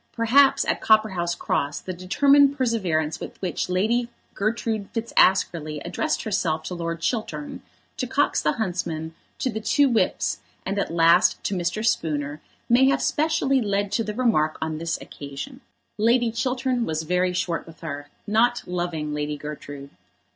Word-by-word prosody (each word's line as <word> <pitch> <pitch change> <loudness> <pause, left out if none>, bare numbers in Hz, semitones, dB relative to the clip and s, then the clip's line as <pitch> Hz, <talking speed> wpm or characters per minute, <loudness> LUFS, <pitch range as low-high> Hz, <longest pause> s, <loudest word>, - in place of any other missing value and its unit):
Perhaps 255 +5 +4
at - - -1
Copperhouse 190 -6 +2
Cross 145 +1 -1
the 185 - -5
determined 280 +10 +4
perseverance 185 - 0
with - - -8
which 185 -1 -2
Lady 225 +6 +1 0.2
Gertrude 215 0 -2
Fitzaskerley 180 -9 +2
addressed 305 - -1
herself 165 -7 -1
to - - -5
Lord 170 -1 -4
Chiltern, 270 - -3 0.4
to 255 - -2
Cox 285 +3 +1
the 150 - +1
huntsman, 170 -6 -3 0.2
to 255 - -1
the 220 - -3
two 275 +7 +3
whips, 235 -4 +1 0.3
and 195 +1 -1
at - - -1
last 170 +1 +4
to - - -1
Mr. 180 +4 -1
Spooner, 150 -7 -1 0.3
may 245 +3 +5
have 275 - +3
specially 300 -4 +1
led 200 -2 -1
to 225 +2 +1
the 210 -1 -5
remark 215 -11 +2
on 160 -1 -3
this 165 0 -2
occasion. 145 - -8 0.4
Lord 235 +1 +3
Chiltern 250 +1 0
was 160 -5 -2
very 180 +2 +1
short 170 -2 -2
with 165 0 -14
her, 145 -2 -6 0.2
not 235 +3 +2
loving 175 -4 -3
Lady 150 0 -2
Gertrude. 145 -1 -8
190 Hz, 155 wpm, -24 LUFS, 160-235 Hz, 0.4 s, may